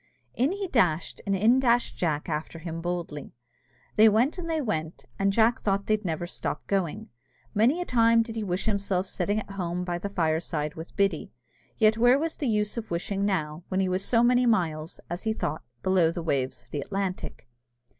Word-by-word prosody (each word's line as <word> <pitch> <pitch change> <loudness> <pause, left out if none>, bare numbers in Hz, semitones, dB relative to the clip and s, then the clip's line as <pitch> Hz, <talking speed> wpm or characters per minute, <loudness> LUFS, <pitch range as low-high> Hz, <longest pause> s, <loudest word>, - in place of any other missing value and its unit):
In 260 +6 +1
he 395 0 -3
dashed, 180 - +1
and 200 - +2
in 225 +7 +4
dashed 245 -2 +2
Jack 155 -4 -1
after 160 0 -3
him 165 0 -6
boldly. 170 -6 -4 0.6
They 220 +1 +8
went 240 - +2
and 335 -2 -5
they 320 -1 0
went, 165 - -3
and 195 0 +3
Jack 230 +4 +3
thought 200 -1 0
they'd 215 0 +1
never 170 -2 -2
stop 175 - -4
going. 190 -5 -2 0.4
Many 240 - +3
a - - -2
time 230 -3 +4
did 225 -1 -8
he 220 - -2
wish 180 -2 -2
himself 200 -3 0
sitting 200 +3 -1
at 200 - -8
home 180 -2 -3
by 175 -1 -2
the 200 - -4
fireside 160 -4 -1
with 160 +1 -9
Biddy. 195 -5 0 0.5
Yet 220 0 +4
where 245 +3 +6
was 320 +2 -2
the 285 - -2
use 210 +1 0
of 225 -1 -4
wishing 195 +4 -1
now, 160 -5 -1
when 185 - -1
he 190 - +2
was 185 +1 0
so 230 +2 +3
many 245 0 +4
miles, 165 -7 0
as 175 +2 -4
he 220 -1 0
thought, 155 -7 -3 0.2
below 185 -3 +4
the 170 0 -4
waves 135 -4 -1
of - - -31
the 145 - -2
Atlantic? 195 -5 -4
195 Hz, 200 wpm, -27 LUFS, 170-225 Hz, 0.6 s, They